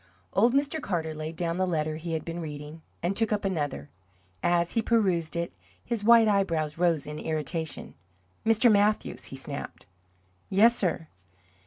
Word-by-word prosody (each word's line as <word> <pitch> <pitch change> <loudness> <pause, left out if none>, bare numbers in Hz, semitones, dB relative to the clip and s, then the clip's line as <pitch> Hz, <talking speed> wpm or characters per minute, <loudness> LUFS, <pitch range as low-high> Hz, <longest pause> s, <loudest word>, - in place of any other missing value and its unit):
Old 240 +3 +4
Mr. 285 +3 +1
Carter 165 - -2
laid 155 +1 -6
down 170 +1 -2
the 185 0 +1
letter 155 -3 -1
he 165 +1 -5
had 160 - -3
been 170 +1 -5
reading, 150 0 -7 0.2
and 180 +3 0
took 225 0 +2
up 205 -1 0
another. 145 - -2 0.5
As 175 0 +2
he 230 - +1
perused 190 -9 +1
it 170 0 -2 0.3
his 230 -3 -2
white 230 0 +7
eyebrows 165 -7 +1
rose 170 -4 +2
in 150 +1 -6
irritation. 160 0 -3 0.5
"Mr. 225 +1 +5
Mathews!" 210 +1 +1
he - - -8
snapped. 140 -4 -7 0.6
"Yes, 225 +5 +5
sir?" 175 -6 -1
170 Hz, 160 wpm, -27 LUFS, 155-210 Hz, 0.6 s, white